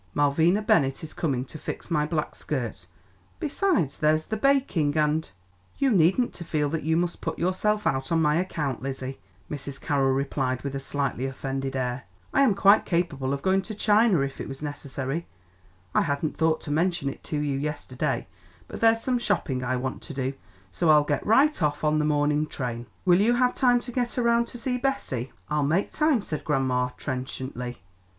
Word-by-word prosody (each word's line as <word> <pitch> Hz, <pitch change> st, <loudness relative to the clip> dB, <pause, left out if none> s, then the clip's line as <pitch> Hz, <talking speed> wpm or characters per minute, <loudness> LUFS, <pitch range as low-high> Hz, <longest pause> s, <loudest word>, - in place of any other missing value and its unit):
Malvina 160 Hz, +8 st, +3 dB
Bennett 165 Hz, -, +2 dB
is 160 Hz, -, -8 dB
coming 130 Hz, -6 st, -1 dB
to 155 Hz, -, -10 dB
fix -, -, -6 dB
my 150 Hz, -2 st, +2 dB
black 155 Hz, -2 st, -2 dB
skirt; 120 Hz, -10 st, -4 dB, 0.5 s
besides, 300 Hz, -, 0 dB
there's 155 Hz, 0 st, +2 dB
the 220 Hz, -, -3 dB
baking 215 Hz, -, +2 dB
and 155 Hz, +1 st, +1 dB, 0.2 s
" 90 Hz, +1 st, -34 dB
"You 275 Hz, -2 st, +2 dB
needn't 190 Hz, +6 st, +3 dB
to 170 Hz, -, -7 dB
feel 150 Hz, -3 st, 0 dB
that 160 Hz, +1 st, -2 dB
you 160 Hz, +2 st, +1 dB
must 175 Hz, 0 st, -1 dB
put 160 Hz, -, -3 dB
yourself 210 Hz, +4 st, 0 dB
out 135 Hz, +2 st, 0 dB
on 165 Hz, -, +3 dB
my 150 Hz, -1 st, +3 dB
account, 155 Hz, -8 st, -2 dB
Lizzie," 135 Hz, 0 st, -5 dB, 0.3 s
Mrs. 140 Hz, -1 st, -6 dB
Carroll 135 Hz, -2 st, +1 dB
replied 135 Hz, -2 st, -1 dB
with 140 Hz, -1 st, -3 dB
a 135 Hz, -, -2 dB
slightly 135 Hz, -2 st, -2 dB
offended 135 Hz, 0 st, -4 dB
air. 125 Hz, 0 st, -2 dB, 0.3 s
"I 275 Hz, -, +4 dB
am 250 Hz, -8 st, +4 dB
quite 200 Hz, +2 st, +6 dB
capable 160 Hz, -7 st, -1 dB
of 140 Hz, 0 st, -3 dB
going 190 Hz, 0 st, +3 dB
to 215 Hz, +3 st, -7 dB
China 210 Hz, -4 st, +4 dB
if 135 Hz, 0 st, -3 dB
it -, -, -5 dB
was 135 Hz, +2 st, -7 dB
necessary. 145 Hz, +1 st, -4 dB, 0.7 s
I -, -, +4 dB
hadn't 140 Hz, +2 st, -1 dB
thought 160 Hz, -1 st, +1 dB
to 145 Hz, -, -5 dB
mention 170 Hz, -1 st, +1 dB
it 135 Hz, -, -5 dB
to 150 Hz, -, -2 dB
you 145 Hz, -2 st, -1 dB
yesterday, 145 Hz, -3 st, -2 dB, 0.4 s
but -, -, -8 dB
there's 225 Hz, 0 st, +4 dB
some 250 Hz, 0 st, 0 dB
shopping 140 Hz, -, -1 dB
I 130 Hz, 0 st, 0 dB
want 130 Hz, +1 st, -3 dB
to 150 Hz, -, -9 dB
do, 135 Hz, 0 st, -1 dB, 0.4 s
so 170 Hz, -, +1 dB
I'll 150 Hz, -1 st, +7 dB
get 145 Hz, -1 st, -1 dB
right 270 Hz, +4 st, +4 dB
off 150 Hz, -1 st, 0 dB
on 155 Hz, 0 st, +3 dB
the 150 Hz, -, +1 dB
morning 150 Hz, 0 st, +2 dB
train." 120 Hz, -4 st, -4 dB, 0.2 s
"Will 180 Hz, +1 st, +5 dB
you 235 Hz, +3 st, +4 dB
have 250 Hz, 0 st, +3 dB
time 245 Hz, -2 st, +4 dB
to 245 Hz, -, -6 dB
get 245 Hz, 0 st, -2 dB
around 235 Hz, -1 st, +3 dB
to -, -, -8 dB
see 250 Hz, +1 st, -2 dB
Bessie?" 190 Hz, -, -2 dB, 0.2 s
"I'll 150 Hz, 0 st, 0 dB
make 160 Hz, +8 st, +1 dB
time," 300 Hz, -8 st, +2 dB
said 155 Hz, -, -4 dB
grandma 130 Hz, -4 st, +1 dB
trenchantly. 130 Hz, -2 st, -5 dB
150 Hz, 195 wpm, -26 LUFS, 135-195 Hz, 0.7 s, I'll